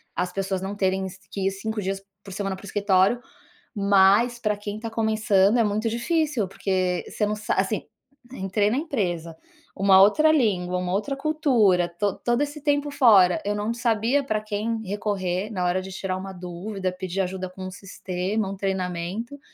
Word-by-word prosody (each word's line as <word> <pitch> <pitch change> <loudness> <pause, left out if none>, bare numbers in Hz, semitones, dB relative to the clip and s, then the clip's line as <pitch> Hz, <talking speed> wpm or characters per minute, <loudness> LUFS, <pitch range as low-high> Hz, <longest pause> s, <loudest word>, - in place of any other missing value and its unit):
as 180 0 -1
pessoas 190 0 -2
não 195 +1 -4
terem 190 -1 0
es 190 0 -8
que 195 -1 -2
ir 195 - +1
5 215 +2 -4
dias 195 +1 -3 0.2
por 195 - -10
semana 195 0 -3
para 190 - -14
o - - -9
escritório, 200 +2 +2 0.6
mas 200 +4 +4
pra 210 -3 0
quem 205 0 -5
tá 230 - -4
começando 215 -1 +2
é 230 - +4
muito 215 +2 0
difícil, 290 - 0
porque 185 -1 -1
você 210 - -1
não 210 +1 -1
sa 210 - -2
assim, 195 +3 0 0.5
entrei 200 0 0
na 225 - 0
empresa, 175 - -2 0.4
uma 195 -1 +6
outra 305 +11 +5
língua, 185 - +1
uma 180 0 -2
outra 270 +8 -1
cultura, 250 - +2
to 195 +3 -1
todo 240 +3 +1
esse 290 +1 -2
tempo 290 0 +1
fora, 200 -10 +5
eu 205 0 0
não 210 +3 -1
sabia 235 +3 +1
pra 215 -5 -1
quem 215 +1 -2
recorrer 200 -1 -2
na 185 -3 -2
hora 180 +1 +1
de 190 - -8
tirar 185 0 -3
uma 190 0 -7
dúvida, 185 +2 -4
pedir 185 +1 -3
ajuda 185 0 -3
com 185 0 -9
o - - -7
sistema, 195 +1 -3
um 195 - -6
treinamento, 190 +6 -3
200 Hz, 185 wpm, -24 LUFS, 185-220 Hz, 0.6 s, uma